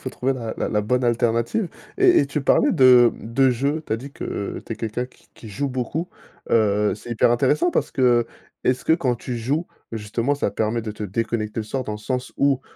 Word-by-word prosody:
faut 130 - -5
trouver 130 +2 -1
la 115 -4 -5
la - - -1
la 105 - +1
bonne 125 +4 0
alternative. 120 - +1 0.3
Et 380 -2 +6
et 140 - +2
tu 145 +1 -2
parlais - - +3
de 125 -2 +6
de 130 +4 +1
jeux 140 +6 0
tu - - -3
as - - +2
dit 135 +4 -9
que 100 - -4
tu - - -4
es - - -5
quelqu'un 115 +2 -3
qui - - -26
qui 110 - -12
joue 140 +8 -2
beaucoup. 130 +7 -3 0.4
Heu, 105 -2 +3
c'est 120 - -11
hyper 115 - +3
intéressant 145 +8 +2
parce - - -1
que 120 -3 +3 0.4
est-ce 125 0 +1
que - - +3
quand 135 -7 +1
tu 120 +1 -5
joues 145 +9 -1 0.2
justement, 115 +5 -1
ça 145 - -1
permet 110 +2 -1
de 110 - -4
te 105 - -8
déconnecter 110 +2 -2
le - - -5
soir 130 +3 -3
dans 105 - -4
le 105 - -5
sens 125 +3 -3
où, 140 -2 +3
120 Hz, 225 wpm, -22 LUFS, 110-135 Hz, 0.4 s, Et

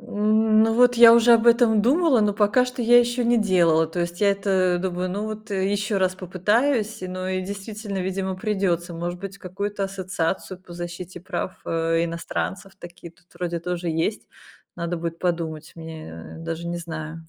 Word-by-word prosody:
Ну, 215 +1 +2
вот 245 +1 +5
я 235 -1 +9
уже 235 0 +6
об 230 0 +4
этом 230 -3 +5
думала, 275 -1 +3
но 210 -1 +2
пока 210 +5 +3
что 250 0 -5
я 240 +1 +6
ещё 240 0 +1
не 240 +1 +3
делала. 170 -5 +3
То 165 +2 -4
есть 175 +2 -3
я 205 - +4
это 190 -3 +1
думаю: 180 0 -2
"Ну, 205 +3 -3
вот 215 0 -7
ещё 200 +1 0
раз 185 -1 +1
попытаюсь". 210 +6 0
Но 185 0 -4
и, 185 0 -1
действительно, 200 +1 -6
видимо, 190 0 -3
придётся. 185 -4 -1
Может 175 +1 -4
быть, 200 0 -7
какую-то 200 +2 -4
ассоциацию 185 -1 -3
по 180 - -14
защите 175 +1 -7
прав, 185 0 -4
э, 165 0 0
иностранцев. 165 - -5
Такие 175 -1 -11
тут 175 - -30
вроде 175 -1 -3
тоже 175 0 -3
есть. 165 +7 -2 0.5
Надо 170 +1 -3
будет 165 0 -5
подумать 165 -3 -3
мне. 160 - -9
Даже 165 +1 -5
не 175 - -3
знаю. 160 -1 -7
185 Hz, 175 wpm, -23 LUFS, 170-215 Hz, 0.5 s, я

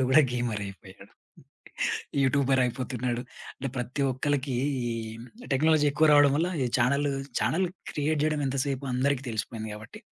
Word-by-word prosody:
రానోడు 130 - +3
గూడా 135 +4 +7
గేమరయిపోయాడు. 100 -4 -5 1.1
యూట్యూబరయిపోతున్నాడు. 130 -2 +1 0.3
అంటే 135 - -4
ప్రతి 125 +3 -2
ఒక్కళ్ళకి 135 0 -1 0.3
ఈ 120 - -1 0.6
టెక్నాలజీ 155 +2 +4
ఎక్కువ 155 +2 +3
రావడం 145 -1 +6
వల్ల, 170 +3 +1 0.2
ఈ - - +1
ఛానెల్, 140 +4 +2 0.3
ఛానెల్ 185 +3 +1 0.3
క్రియేట్ 150 0 0
చేయడం 155 -1 +1
ఎంతసేపు, 135 0 -1
అందరికి 135 +1 +1
తెలిసిపోయింది 110 0 -4
కాబట్టి. 105 0 -11
130 Hz, 125 wpm, -28 LUFS, 120-145 Hz, 1.1 s, గూడా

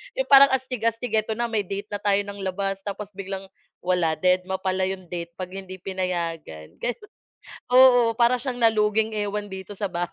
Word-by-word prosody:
'Yong - - -2
parang 275 0 +9
astig-astig, 245 -2 -1
"Ito 215 +1 0
na 235 +1 -1
may 210 -2 0
date 200 +2 -5
na 205 - -3
tayo 205 -1 +2
ng 200 0 -8
labas," 195 +1 -2
tapos 205 0 -5
biglang 195 0 -6 0.3
wala, 180 -3 +1
dedma 185 +2 0
pala 185 0 0
'yong 185 -2 -5
date 170 -1 -6
'pag 180 0 -6
hindi 185 -1 -9
pinayagan, 170 - -4
gano'n. 315 - -4 0.7
Oo, 245 -3 +6
para 240 +1 +4
siyang 255 -3 -4
naluging 220 0 +2
ewan 205 -1 -3
dito 190 +2 -8
sa 200 -1 -3
bahay. 175 0 -2
200 Hz, 180 wpm, -24 LUFS, 185-225 Hz, 0.7 s, parang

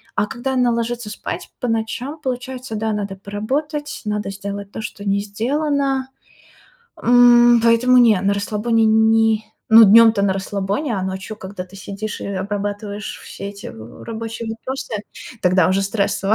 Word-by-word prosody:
А 210 - +2
когда 265 +4 -4
она 250 -2 +2
ложится 235 -1 -2
спать 210 - -6
по 245 - -2
ночам, 230 +6 -2
получается, 255 -1 -4
да, 220 0 -1
надо 200 -2 -3
поработать, 280 - -4
надо 210 -1 -2
сделать 200 0 -6
то, - - -6
что 200 - -7
не 200 0 +1
сделано. 270 +5 -1 1.0
М, 240 -1 +6
поэтому 240 +2 +5
не, 225 -5 +6
на 200 +1 +2
расслабоне 220 +3 +1
не 220 0 +3 0.3
ну, 225 0 +11
днём-то 225 0 +7
на 195 -1 +2
расслабоне, 200 +7 -2
а 190 - -2
ночью, 190 +3 -5
когда 190 -2 -7
ты 190 +2 -15
сидишь 205 +2 -6
и - - -5
обрабатываешь 205 +1 -4
все - - -9
эти 200 0 -9
в 110 +1 -11
рабочие 230 0 -6
вопросы, 230 0 -5 0.4
тогда 180 -2 +3
уже 190 +1 +2
стрессово. 200 0 0
220 Hz, 155 wpm, -20 LUFS, 200-240 Hz, 1.0 s, ну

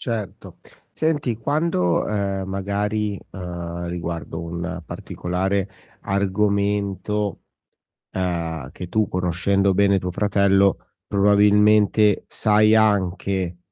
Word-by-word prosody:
Certo. 110 -5 -5 0.3
Senti 145 -7 -1
quando, 145 - 0
ehm, 100 -2 -2
magari, 100 +1 -2
ehm, 85 -2 -6
riguardo 85 -1 -5
un 85 +1 -5
particolare 95 +2 -2 0.3
argomento, 100 0 -1 0.7
ehm, 85 -6 -3
che 90 - -8
tu 110 +3 +1
conoscendo 95 +2 +1
bene 100 0 +3
tuo 90 0 -4
fratello 100 0 +3 0.3
probabilmente 105 +1 +4
sai 105 0 +3
anche 95 -4 +1
100 Hz, 85 wpm, -22 LUFS, 90-105 Hz, 0.7 s, probabilmente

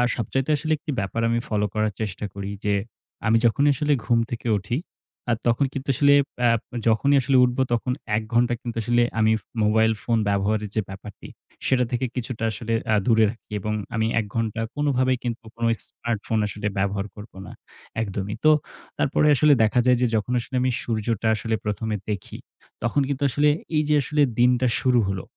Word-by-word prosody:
সবচাইতে 135 +5 -2
আসলে 155 +3 -3
১ 150 - -14
টি 150 - -2
ব্যাপার 100 +4 -2
আমি 115 0 +1
ফলো 105 -1 0
করার 110 -1 0
চেষ্টা 105 -1 -3
করি 100 0 -5 0.2
যে 100 - +2 0.5
আমি 110 +1 +5
যখনই 140 +5 +3
আসলে 150 +2 +1
ঘুম 120 -1 +3
থেকে 120 -1 -4
উঠি, 100 +5 -3 0.5
আ - - +4
তখন 120 +4 +3
কিন্তু 135 0 -5
আসলে 140 +1 +5 0.3
অ্যা 120 -1 +5 0.4
যখনই 140 +6 +3
আসলে 130 +1 +2
উঠবো 125 +1 +1
তখন 120 +2 0 0.2
১ 110 - 0
ঘন্টা 120 +1 +3
কিন্তু 120 -2 -5
আসলে 120 +2 +2 0.2
আমি 110 0 +4 0.3
মোবাইল 110 +1 +3
ফোন 115 -1 +1
ব্যবহারের 100 +1 0
যে 110 - +2
ব্যাপারটি, 100 +1 -10 0.4
সেটা 130 -1 +3
থেকে 125 +1 0
কিছুটা 120 -2 -4
আসলে 115 +1 -4
অ্যা 110 - +3
দূরে 110 -2 +4
রাখি। 115 0 -11
এবং 105 +2 -3 0.2
আমি 110 0 +1
১ 110 - -2
ঘন্টা 115 0 -1
কোনভাবেই 130 -3 +1
কিন্তু 120 -2 -4
কোনো 115 0 0 0.2
স্মার্টফোন 110 -1 -3
আসলে 105 0 -4
ব্যবহার 100 +1 0
করব 105 +1 -11
না, - - -9 0.5
একদমই। 100 -1 -3
তো 155 - +8 0.5
তারপরে 150 +2 +2
আসলে 150 +3 +5
দেখা 110 +3 +2
যায় 125 -1 +5
যে 125 - +3
যখন 110 +3 -1
আসলে 125 +2 -6
আমি 130 0 +2
সূর্যটা 115 -1 -1
আসলে 110 0 -1
১ম 105 +2 -2
এ - - -2
দেখি, 100 - -5 0.5
তখন 120 +5 +1
কিন্তু 140 0 -2
আসলে 150 +3 +3 0.3
এই 155 - +3
যে 150 - +4
আসলে 150 +3 0 0.2
দিনটা 125 +1 +4
শুরু 125 -2 +3
হলো। 95 -3 -3
115 Hz, 185 wpm, -24 LUFS, 105-125 Hz, 0.5 s, তো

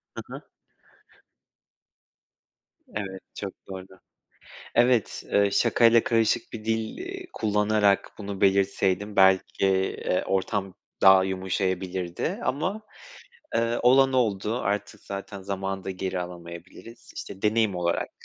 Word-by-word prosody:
Hı - - -5
hı. - - -7 2.5
Evet, 95 -2 -5 0.2
çok 100 -2 -5
doğru. 95 -1 -7 0.9
Evet, 120 -1 +2
eee, 100 0 +4
şakayla 115 +1 +4
karışık 115 -3 +1
bir 110 -2 -7
dil, 110 0 -2
iii, 380 0 -7
kullanarak 105 -1 +2
bunu 100 -1 -6
belirtseydim 100 +1 +2
belki, 95 0 +4
eee, 95 -1 0
ortam 95 0 -1 0.3
daha 95 -1 +8
yumuşayabilirdi 95 -1 -2
ama, 185 - -1 0.7
eee, 115 +1 +1
olan 135 +2 +5
oldu. 110 -2 +1
Artık 100 -1 -2
zaten 100 0 -7
zamanı 95 0 -4
da 95 - -3
geri 95 0 -3
alamayabiliriz. 90 +6 -10
İşte, 95 - -8
deneyim 110 -2 +2
olarak 85 -1 -1
100 Hz, 110 wpm, -26 LUFS, 95-115 Hz, 2.5 s, daha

